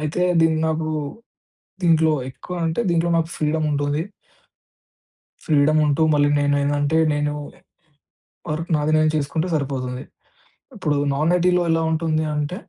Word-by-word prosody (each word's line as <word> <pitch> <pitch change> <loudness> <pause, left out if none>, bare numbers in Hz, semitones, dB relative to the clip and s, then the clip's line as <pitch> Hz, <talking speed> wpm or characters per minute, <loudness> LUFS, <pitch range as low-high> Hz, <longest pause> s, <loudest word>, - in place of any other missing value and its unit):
అయితే, 155 +3 -3 0.2
దీన్ని 160 -1 +3
నాకూ 160 0 -1 0.9
దీంట్లో 160 -2 +4 0.2
ఎక్కువ 180 +7 -9
అంటే, 165 +8 -1
దీంట్లో 170 0 +1
నాకు 165 0 0
ఫ్రీడముంటుంది. 150 -1 0 1.4
ఫ్రీడముంటూ 150 0 +2
మళ్ళీ 145 0 +3
నేనేందంటే, 145 +2 +1
నేనూ 145 0 -1 0.2
ఎ - - -26 0.9
వర్క్ 165 +3 -4
నాది 150 +1 0
నేను 155 0 +3
చేసుకుంటే 155 +4 -1
సరిపోతుంది. 130 -2 -3 0.7
ఇప్పుడు 155 -8 -1 0.2
నాన్ 155 +5 +1
ఐటీ‌లో 180 0 +2
ఎలా 165 0 +1
ఉంటుంది 160 -1 0
అంటే 150 +4 -2
155 Hz, 120 wpm, -21 LUFS, 145-160 Hz, 1.4 s, దీంట్లో